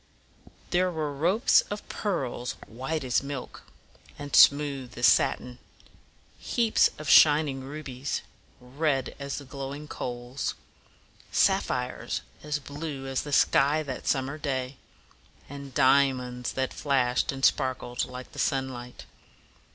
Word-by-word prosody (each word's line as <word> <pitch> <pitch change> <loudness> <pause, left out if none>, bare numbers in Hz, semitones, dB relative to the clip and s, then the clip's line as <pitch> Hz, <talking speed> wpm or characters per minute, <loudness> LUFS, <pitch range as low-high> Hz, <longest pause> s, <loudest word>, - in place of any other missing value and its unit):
There 180 +1 +3
were 155 -4 -3
ropes 180 - +4
of 205 +1 -6
pearls, 130 - -3
white 135 +7 -4
as 125 -1 +1
milk, 140 -2 -7 0.6
and 145 -1 -4
smooth 140 -4 +4
as 120 - +2
satin; 125 0 +2 0.8
heaps 230 -2 +2
of 155 - -8
shining 145 -3 +5
rubies, 140 -1 -5 0.4
red 135 +2 -1
as 140 0 -4
the 140 - -7
glowing 140 +3 -7
coals; 120 0 -4 0.8
sap - - +3
phires - - -3 0.2
as 150 0 -2
blue 145 0 -6
as 135 -1 -1
the 145 - -7
sky 145 +2 +3
that 130 -3 -6
summer 135 +2 0
day; 130 -2 -3 0.7
and 140 -1 -9
di 135 +2 +6
a 135 - -2
monds 125 -1 -5
that 130 0 -1
flashed 130 0 +1
and 135 0 0
sparkled 125 -2 0
like 125 0 -9
the - - -9
sunlight. 130 -2 -2
135 Hz, 130 wpm, -27 LUFS, 130-150 Hz, 0.8 s, di